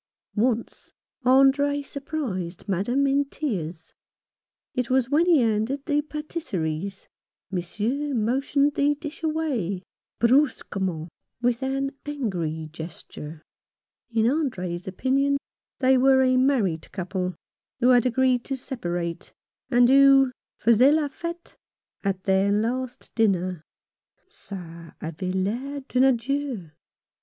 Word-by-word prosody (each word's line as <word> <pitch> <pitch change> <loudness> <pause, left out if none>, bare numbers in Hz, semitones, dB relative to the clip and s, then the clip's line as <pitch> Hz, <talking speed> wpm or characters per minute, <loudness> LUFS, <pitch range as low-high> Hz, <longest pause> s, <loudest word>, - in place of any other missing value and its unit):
Once 230 +1 -1 0.3
Andre 275 +2 +4
surprised 255 - -5
Madame 210 +9 +1
in 275 +1 +3
tears. 180 - -4 0.8
It 250 -2 -1
was 260 0 +2
when 325 +4 +4
he 330 -6 +5
handed 230 +5 0
the 295 0 +2
pattiseries, 200 - -4 0.4
Monsieur 220 +11 -2
motioned 275 +5 +1
the 290 +1 +2
dish 300 +1 -8
away 275 - -1 0.2
— - - -62
brusquement, 195 - +1 0.3
with 245 0 +1
an 270 +1 -1
angry 175 - -3
gesture. 160 -1 -8 0.7
In 225 -1 +2
Andre's 185 - -1
opinion 270 +8 +1 0.4
they 260 -1 +4
were 265 0 +5
a 255 0 +3
married 245 - +1
couple, 185 -1 -3 0.4
who 250 0 +4
had 245 -1 +5
agreed 250 0 +2
to 270 - -3
separate, 175 - -4 0.4
and 245 -2 +5
who 270 0 +6 0.3
faisaient 245 +6 +5
la 300 -2 +1
fete 340 +4 -7 0.5
at 195 -2 -1
their 195 +1 +3
last 245 +4 -2
dinner. 185 -6 +1 0.7
"Ca 170 - -10
avait 165 +3 -4
l'air 245 +10 -2
d'un 260 -1 +2
adieu. 260 - 0
245 Hz, 110 wpm, -25 LUFS, 190-275 Hz, 0.8 s, who